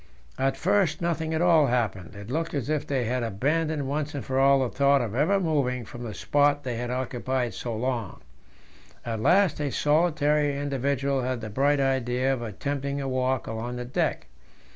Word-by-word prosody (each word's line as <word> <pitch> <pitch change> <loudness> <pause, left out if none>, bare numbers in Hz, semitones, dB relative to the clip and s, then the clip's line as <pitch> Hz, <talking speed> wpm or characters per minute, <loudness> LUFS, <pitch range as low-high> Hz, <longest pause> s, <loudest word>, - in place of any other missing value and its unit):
At 135 +1 +1
first 185 -4 +2
nothing 165 -2 -1
at 160 - +1
all 165 -5 +5
happened; 110 -5 -1
it 100 +3 -8
looked 160 +2 -2
as 140 -1 -2
if 155 -2 -1
they 130 -4 0
had 125 +2 -1
abandoned 145 +7 -1
once 145 +1 -2
for 135 -2 -2
all 135 0 +5
the 130 - 0
thought 140 +2 +3
of 115 -5 -3
ever 160 +11 +2
moving 140 -8 0
from 120 - -10
the 110 -4 -6
spot 145 - +2
they 125 -2 -3
had 120 +1 -3
occupied 125 -1 -2
so 115 +3 -4
long 120 -5 -3 0.9
At 115 -2 -3
last 180 - +3
a 145 -1 -1
solitary 150 -1 +2
individual 140 -1 -1
had 125 -1 -2
the 110 -2 -7
bright 140 +5 +2
idea 130 -1 +1
of 130 - -4
attempting 140 +6 -3
a 135 - -3
walk 130 0 0
along 115 +2 -4
the 125 0 -5
deck. 125 - -1
135 Hz, 185 wpm, -26 LUFS, 125-145 Hz, 0.9 s, all